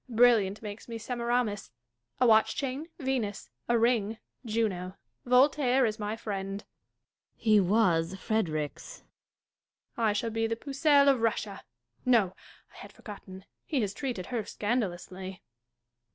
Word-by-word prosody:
A - - -8
brilliant 220 -4 +4
makes 210 0 -7
me 230 - -4
Semiramis; 235 -3 -1 0.5
a 250 - +4
watch 220 -2 +5
chain, 275 +3 -3
Venus; 240 - -2 0.2
a 240 - +4
ring, 225 -2 +2 0.3
Juno. 205 -5 -2 0.3
Voltaire 260 0 +4
is 215 0 -2
my 210 +1 -2
friend. 200 -2 -4 0.7
Dashkof. - - -26
He 215 -2 +6
was 185 -3 +2
Frederick's. 180 - -2 0.9
Catharine. 230 -1 +1
I - - +1
shall 225 +2 -1
be 225 0 0
the 225 - -1
Pucelle 280 +3 +3
of 270 -4 +4
Russia. 215 -3 -1 0.4
No! 225 -7 +3 0.4
I - - -16
had - - -10
forgotten; 190 -3 -11 0.2
he 285 -5 -1
has 205 -2 -1
treated 240 -7 -4
her 230 -3 0
scandalously. 190 -4 -3
220 Hz, 135 wpm, -29 LUFS, 200-245 Hz, 0.9 s, He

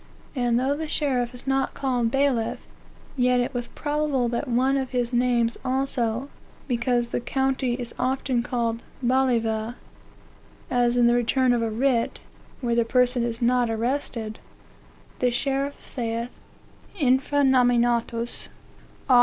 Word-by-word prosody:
And, 240 -2 +2
though 270 +3 +1
the 315 +1 -4
sheriff 255 -6 0
is 245 - -9
not 270 0 0
called 250 -4 0
bailiff, 270 -3 0 0.5
yet 250 -1 +3
it 245 +3 -1
was 245 -1 -3
probable 290 -4 -1
that 235 - -2
was 240 -1 +1
one 265 +2 +3
of 265 -2 -1
his 245 -1 -1
names 240 -1 +1
also, 255 -2 0 0.4
because 240 -1 0
the - - 0
county 265 0 0
is 240 -2 -6
often 255 -1 0
called 235 -2 -2 0.2
balliva; 235 -3 +1 1.0
as 245 -1 +2
in 240 - +5
the 235 - +5
return 245 +1 +2
of 240 - +1
a 230 - 0
writ, 235 +1 +1 0.4
where 240 -2 0
the 235 0 +3
person 250 +1 +2
is 235 0 -2
not 245 0 +3
arrested, 225 -1 -2 0.8
the 250 - +3
sheriff 275 +3 -2
saith, 235 -1 -4 0.6
infra 275 +1 +2
nominatus, 240 -2 +2 0.6
A. 250 -2 +6
245 Hz, 140 wpm, -25 LUFS, 235-265 Hz, 1.0 s, A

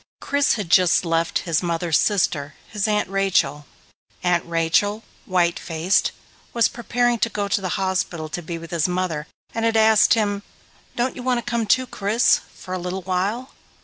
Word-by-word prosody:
Chris 285 0 +1
had 200 -7 -4
just 180 -1 +4
left 165 0 0
his 165 -3 +1
mother's 170 -2 0
sister, 155 -8 0
his 210 -1 -2
Aunt 210 -1 +1
Rachel. 180 -7 0 0.6
Aunt 175 -1 +2
Rachel, 170 +6 +1 0.2
white 175 -2 +1
faced, 165 +4 +1 0.4
was 235 -1 +4
preparing 240 0 0
to 230 - +1
go 205 -2 -2
to 200 - 0
the 185 -2 -2
hospital 185 -4 -2
to 175 - -5
be 170 0 -5
with 165 0 -10
his 170 -2 +1
mother 180 -4 -2 0.3
and 225 - -2
had 225 0 +2
asked 220 +1 +5
him, 205 -2 0 0.5
"Don't 245 +1 -1
you 255 - -7
want 250 0 +1
to 240 - -5
come 235 -2 -1
too, 255 +5 +3
Chris? 220 0 +2
For 185 - -8
a 185 - -2
little 180 +2 -4
while?" 195 +8 -2
190 Hz, 180 wpm, -22 LUFS, 170-220 Hz, 0.6 s, asked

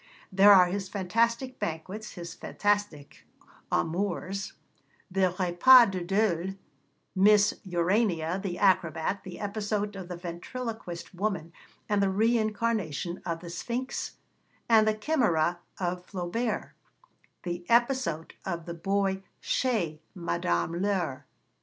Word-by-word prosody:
There 195 +2 +7
are 185 -2 +8
his 190 +1 -3
fantastic 230 +6 0
banquets, 185 +7 -5
his 170 -3 -7
fantastic 205 -8 -2 0.5
amours: 195 +2 -1 0.6
the 185 -1 +2
repas 195 +6 +7
de 185 -2 -3
deuil, 195 -1 0 0.6
Miss 205 +2 +5
Urania 180 -1 +1
the 185 -3 -3
acrobat, 185 -1 +1
the 185 - -9
episode 205 0 -2
of 190 -2 -7
the 180 -1 -6
ventriloquist 180 +2 -6
woman 185 -4 -2 0.3
and 205 -1 +2
the 195 - +3
reincarnation 215 -5 0
of 165 -1 -2
the 170 -1 -8
Sphinx 240 +9 -4 0.5
and 220 -2 +5
the 215 - +2
Chimæra 210 - +1 0.2
of 180 -1 -2
Flaubert, 205 +5 -3 0.7
the 175 0 -4
episode 235 - +1
of 170 -3 -4
the 170 - -5
boy 195 +2 0 0.2
chez 190 -12 0 0.2
Madame 170 - -1
Laure. 170 -10 -1
190 Hz, 115 wpm, -28 LUFS, 175-215 Hz, 0.7 s, are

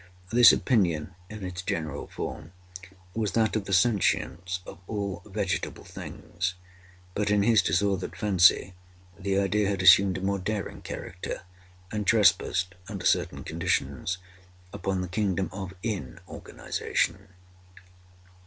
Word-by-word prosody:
This 120 0 +9
opinion, 90 - +1 0.2
in 105 -2 -8
its 90 -1 -5
general 80 -5 -3
form, 80 +2 -6 0.6
was 105 -4 -1
that 110 -1 +2
of 105 -3 -1
the 100 - -6
sentience 90 -3 +1
of - - -10
all 100 -3 -3
vegetable - - -2
things. 90 +2 -5 0.6
But, 105 +1 0
in 105 -1 +3
his 110 -1 +5
disordered 95 +3 0
fancy, 95 -1 +4 0.5
the 95 0 0
idea 100 +1 +2
had 95 -2 -1
assumed 95 0 +7
a - - -6
more 100 +1 0
daring 100 +2 -4
character, 90 +1 -6 0.5
and 105 -2 -3
trespassed, 95 -4 +3 0.2
under 100 -4 -6
certain - - +1
conditions, 90 0 -1 0.6
upon 95 -1 -2
the 90 - -3
kingdom 95 0 -1
of 95 -1 -6
inorganization. 100 - -3
95 Hz, 125 wpm, -27 LUFS, 90-105 Hz, 0.6 s, This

